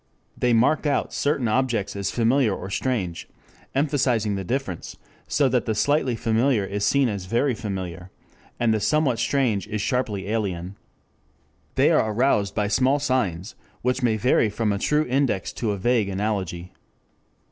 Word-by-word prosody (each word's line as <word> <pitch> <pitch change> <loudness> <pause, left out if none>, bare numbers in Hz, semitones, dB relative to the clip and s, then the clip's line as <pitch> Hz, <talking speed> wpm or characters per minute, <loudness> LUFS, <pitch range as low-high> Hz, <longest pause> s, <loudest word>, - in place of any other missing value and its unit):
They 125 - +1
mark 125 +7 +3
out 145 - 0
certain 140 -4 0
objects 115 -3 0
as 100 -1 -2
familiar 120 -2 +2
or 95 +2 -7
strange, 95 -7 -2 0.5
emphasizing 130 -7 +1
the 95 -1 -3
difference, 110 -5 -4 0.3
so 145 - +2
that 125 -2 0
the 110 - 0
slightly 140 0 +1
familiar 115 0 +1
is 100 +1 -3
seen 135 +6 +3
as 100 -5 -4
very 120 +6 +1
familiar, 95 -5 -5 0.5
and 115 -2 +2
the 110 - +1
somewhat 140 -1 +1
strange 115 -4 0
as 110 0 -3
sharply 105 -4 -1
alien. 100 -4 -2 1.0
They - - +4
are 110 - +2
aroused 105 -4 +1
by 105 -1 +1
small 130 +7 +2
signs, 120 - -1 0.3
which 125 +2 0
may 115 -3 +2
vary 115 -1 +3
from 105 +1 -1
a 100 - -1
true 150 +6 +1
index 130 -7 0
to 115 - -2
a 100 - -1
vague 110 0 +1
analogy. 95 -3 -3
115 Hz, 160 wpm, -24 LUFS, 100-130 Hz, 1.0 s, They